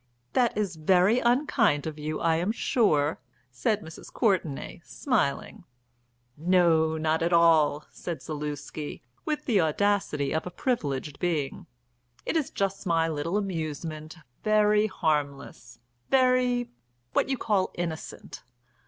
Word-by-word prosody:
"That 245 -4 +2
is 195 -5 -1
very 185 +8 +4
unkind 240 - +2
of 155 -1 -5
you, 155 +1 -3
I 165 -1 +2
am 180 +5 0
sure," 160 - +1 0.3
said 200 - 0
Mrs. 160 0 -11
Courtenay, 175 - -1
smiling. 220 - -1 0.7
"No, 165 -1 +3
not 160 +1 0
at 170 +1 +1
all," 160 -3 +4
said 160 -7 -6
Zaluski, 150 0 -5 0.2
with 300 -1 -2
the 215 -7 +3
audacity 160 -4 0
of 160 +2 -1
a - - -3
privileged 150 - -2
being. 155 -6 -2 0.6
"It - - -2
is 310 -4 +1
just 195 -1 -2
my 165 -1 +2
little 165 +4 -2
amusement, 160 -4 -4 0.3
very 210 0 +4
harmless, 145 - -2 0.3
very 255 -2 +2 0.4
what - - +1
you 265 - 0
call 200 -5 +1
innocent. 165 -2 -6
170 Hz, 125 wpm, -27 LUFS, 155-210 Hz, 0.7 s, very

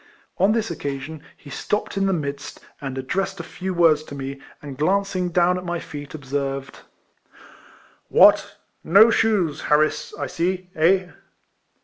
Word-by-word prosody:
On 195 - +4
this 225 -1 -1
occasion, 140 +2 -5 0.2
he 145 - -14
stopped 210 +9 -2
in 195 0 +1
the - - +2
midst, 145 -4 -4 0.2
and 135 -2 -5
addressed 190 +9 -2
a - - -4
few 190 +1 -5
words 165 -4 +4
to 140 - -9
me, 135 0 -6 0.2
and 145 -2 -8
glanc 195 +7 0
ing 180 -1 0
down 180 +1 +2
at - - -9
my 175 -1 -2
feet, 145 -1 -8
observed: 135 -1 -4 1.3
"What! - - +5 0.3
no 205 +7 +6
shoes, 195 -11 +1
Harris, 150 +1 +2
I - - -2
see, 180 +1 -2
eh?" 180 +3 +3
165 Hz, 150 wpm, -22 LUFS, 140-190 Hz, 1.3 s, no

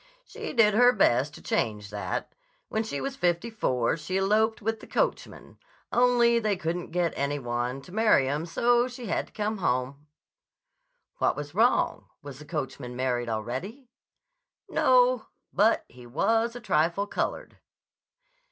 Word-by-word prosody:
"She - - -7
did 220 -5 +5
her 245 +3 +6
best 145 - +2
to - - -13
change 105 -2 -2
that. 105 0 -4 0.4
When 220 - 0
she 220 - -4
was 275 -1 -4
fifty 175 0 0
four 125 - 0
she 175 +4 -3
eloped 215 +3 +2
with 225 0 -2
the - - -13
coachman. - - -3 0.3
Only 240 -1 +4
they 210 -3 0
couldn't 170 0 -3
get 170 0 0
any 140 +1 -1
one 120 +1 -3
to 180 - -14
marry 215 -10 +3
'em, 150 +5 -2
so 240 +7 +2
she 250 -1 -8
had 205 - -2
to - - -24
come 210 0 -2
home." 135 -1 -2 1.1
"What - - +2
was 145 0 -6
wrong? 230 +6 +2 0.2
Was 140 -2 -9
the 150 - -11
coachman 135 -5 -5
married 125 -2 -1
already?" 130 - -5 0.8
"No. 250 -2 +3 0.3
But 215 +3 +3
he 125 0 -14
was 225 - +1
a - - -6
trifle 175 -1 +1
colored." 205 - -4
180 Hz, 150 wpm, -27 LUFS, 135-225 Hz, 1.1 s, her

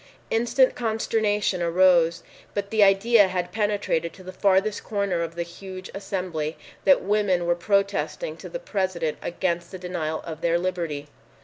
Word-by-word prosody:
Instant 240 +3 +3
consternation 220 -4 0
arose, 170 -1 +4 0.3
but 200 -1 -3
the 220 -1 +2
idea 200 +2 +5
had 180 -1 -3
penetrated 205 -5 0
to 185 - -14
the 185 - -7
farthest 195 +2 +2
corner 200 -5 -1
of 165 0 -4
the 170 - -1
huge 185 +2 -9
assembly 180 -6 -3 0.3
that 280 - +5
women 195 -3 +1
were 175 - +3
protesting 200 - 0
to - - -9
the - - -4
President 185 - -2
against 175 -1 -2
the 190 - -7
denial 175 -4 -3
of 160 -1 -7
their 170 0 +2
liberty. 170 -5 -3
185 Hz, 150 wpm, -25 LUFS, 170-205 Hz, 0.3 s, idea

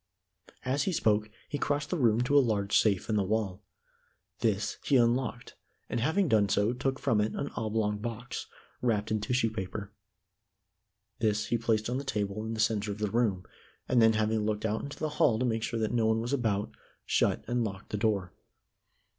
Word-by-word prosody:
As 140 +2 +1
he - - +1
spoke, 110 -8 +2 0.2
he 145 - -4
crossed 145 0 -1
the 180 - +1
room 115 -3 +3
to 125 +4 +1
a - - +9
large 105 -5 0
safe 100 -4 +3
in 110 -2 +1
the 100 - +2
wall. 100 -1 -1 0.8
This 105 -2 0
he 140 - +2
unlocked 120 -1 +1 0.4
and - - 0
having 160 - +2
done 105 -6 +3
so 105 +5 +2
took 130 +1 -1
from 105 -3 +1
it 105 - -1
an 140 - -3
oblong 110 -2 -1
box, 120 +2 -5 0.3
wrapped 110 -4 0
in 110 -1 0
tissue 115 +1 +1
paper. 100 0 -5 1.3
This 110 -1 +1
he 120 - +2
placed 110 -1 +1
on 125 +2 -1
the - - -5
table 105 -4 -2
in 115 - -3
the - - -6
center 110 -1 +1
of 100 - -5
the 105 -2 -2
room, 110 -6 +1 0.4
and 125 -2 +4
then, 110 0 +6
having 110 0 +1
looked 105 0 -1
out 110 0 0
into 140 - -7
the 155 - -2
hall 115 -6 +5
to 125 - 0
make 115 -2 0
sure 115 +1 -2
that 110 +1 -1
no 115 -2 +2
one 110 0 +2
was 120 +4 -2
about, 110 -6 0 0.3
shut - - +1
and 120 0 +1
locked 100 -3 -6
the 105 - -1
door. 100 -4 0
110 Hz, 200 wpm, -30 LUFS, 105-120 Hz, 1.3 s, a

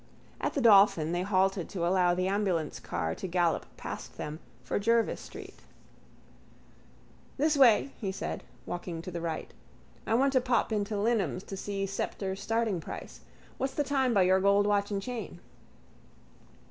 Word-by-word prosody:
At - - -2
the 280 - +1
Dolphin 195 -8 +6
they 175 +1 0
halted 190 -1 +1
to 175 -3 -2
allow 180 0 +3
the 185 +1 0
ambulance 190 -6 -1
car 80 -1 -3
to 190 - -5
gallop 175 -2 +1
past - - -7
them 150 +1 -5 0.2
for - - -1
Jervis 230 +2 +1
street. - - -11 1.8
—This 300 +2 +2
way, 270 0 +5
he 195 -3 -1
said, 190 - -5 0.2
walking 175 -2 -5
to 185 - -6
the 170 -1 -4
right. 165 -2 -4 0.5
I 225 - +2
want 270 +3 +3
to 260 - +4
pop 240 -2 +1
into 210 0 -1
Lynam's 200 - 0
to 195 - -7
see 195 0 -3
Sceptre's 195 0 -3
starting 225 -6 0
price. - - -8 0.4
What's 265 0 -2
the 295 - +1
time 270 -3 +1
by 200 -5 +4
your 185 +1 +4
gold 200 +1 +4
watch 205 -1 +1
and 200 -2 -2
chain? 245 -1 -6
195 Hz, 160 wpm, -30 LUFS, 180-225 Hz, 1.8 s, Dolphin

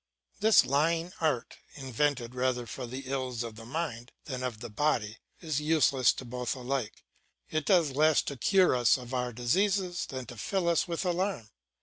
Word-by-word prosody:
This 215 +1 +6
lying 165 +5 +1
art, 150 -7 -1 0.2
invented 130 -2 -1
rather 125 -1 0
for 125 +1 -6
the 130 +3 -6
ills 130 -2 -2
of 115 -2 -7
the 115 +1 -11
mind 125 -5 -4
than 130 -3 -5
of 125 -4 -4
the 120 +1 -7
body, 110 -4 0 0.2
is 155 -4 -1
useless 150 -5 +4
to 130 - -8
both 125 +1 -3
alike; 130 -2 -4 0.5
it 155 -1 -1
does 175 -7 +4
less 155 +2 +3
to 140 - -4
cure 185 +3 +3
us 120 0 +4
of 125 0 -9
our 125 -1 -1
diseases 180 - 0
than 130 -2 -6
to 120 0 -10
fill 185 - -1
us 170 +1 +2
with 170 +2 -3
alarm. 180 - -1
135 Hz, 180 wpm, -29 LUFS, 120-165 Hz, 0.5 s, This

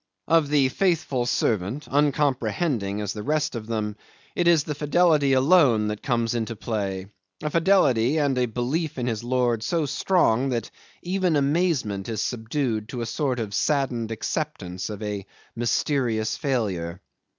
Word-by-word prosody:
Of 160 -3 +3
the 140 -3 +3
faithful 145 -7 0
servant, 110 +6 -1
uncomprehending 135 - 0
as 105 -1 -3
the 105 - -6
rest 150 +5 0
of 115 -3 -6
them, 105 -2 -2 0.4
it 175 - +1
is 165 -4 +5
the 150 - -3
fidelity 150 -1 +3
alone 130 -6 +4
that 105 0 -4
comes 115 -3 0
into 115 -1 -2
play; 100 -4 -3 0.4
a 150 - -1
fidelity 155 - +3
and 145 -3 +2
a 125 - +2
belief 135 +8 -2
in 125 - -2
his 115 -2 -2
lord 120 -2 +1
so 165 +5 0
strong 135 -5 +2
that 120 -4 -2 0.3
even 180 -2 +1
amazement 140 - 0
is 110 -2 -3
subdued 115 -1 -2
to 125 - -4
a - - -2
sort 130 +1 -1
of 105 -3 -4
saddened 125 -3 0
acceptance 105 - -3
of 105 0 -6
a 105 -2 -4 0.3
mysterious 120 -1 0
failure. 95 - -2
125 Hz, 150 wpm, -25 LUFS, 110-150 Hz, 0.4 s, is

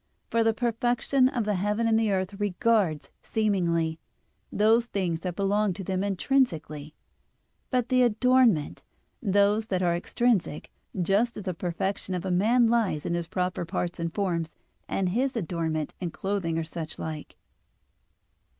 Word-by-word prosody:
For 230 0 +3
the 225 - +4
perfection 245 +3 +1
of 245 -5 -2
the 210 - +1
heaven 210 +4 0
and 225 0 +3
the 225 -1 +1
earth 190 0 -1
regards, 205 -5 +1
seemingly, 170 -7 0 0.5
those 225 +3 +3
things 180 -7 -1
that 180 0 -4
belong 200 0 +1
to 190 - -7
them 185 +1 -1
intrinsically, 175 - -1 0.7
but 250 -2 0
the 255 -1 +4
adornment, 240 - +3 0.4
those 205 0 +2
that 185 -3 -1
are 170 -1 +2
extrinsic, 210 -2 0 0.3
just 200 +7 +1
as 210 - -6
the 185 -2 -2
perfection 185 +2 -3
of 180 0 -4
a 190 - -1
man 225 +7 +4
lies 225 -10 +1
in - - -1
his 170 -1 -2
proper 180 0 -2
parts 170 +1 -3
and 165 0 -2
forms, 170 -4 -2 0.3
and 190 -2 0
his 255 +7 0
adornment, 160 -6 -2
in 180 - -3
clothing 185 -2 -2
or 165 - 0
such 160 -1 -7
like. 155 -2 -6
195 Hz, 150 wpm, -27 LUFS, 170-225 Hz, 0.7 s, the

